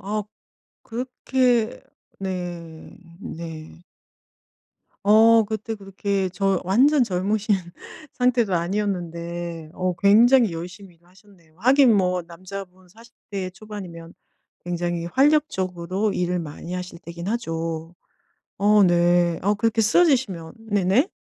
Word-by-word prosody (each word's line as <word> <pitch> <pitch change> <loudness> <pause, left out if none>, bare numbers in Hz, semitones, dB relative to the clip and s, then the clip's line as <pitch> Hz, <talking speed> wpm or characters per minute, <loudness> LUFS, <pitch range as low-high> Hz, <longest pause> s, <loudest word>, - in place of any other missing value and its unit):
아 210 +2 -2 0.6
그렇게 250 -1 0 0.4
네. 175 -4 -6 0.2
네. 165 -2 -8 1.2
어 225 +2 +6
그때 220 +1 -4
그렇게 195 -1 -2
저 195 0 0
완전 260 +9 +4
젊으신 205 +2 0 0.6
상태도 245 -5 +1
아니었는데 170 -3 -3
어 185 -1 -1
굉장히 230 +3 +6
열심히 175 +2 -8
일을 170 +1 -30
하셨네요. 180 -4 -23
하긴 255 0 +5
뭐 180 -2 +1
남자분 185 +2 -10
40 230 +5 -18 0.2
대 195 -3 -3
초반이면 185 -4 -10 0.5
굉장히 175 -1 -2
활력적으로 195 - +1
일을 180 0 -1
많이 165 +1 -7
하실 180 -1 -6
때기는 170 +3 -7
하죠. 165 -6 -4 0.6
어 205 +1 +5
네. 175 -1 +3
어 205 +2 +2
그렇게 225 +1 +1
쓰러지시면 220 - +2 0.2
네네. 205 - +2
190 Hz, 230 characters per minute, -23 LUFS, 175-215 Hz, 1.2 s, 어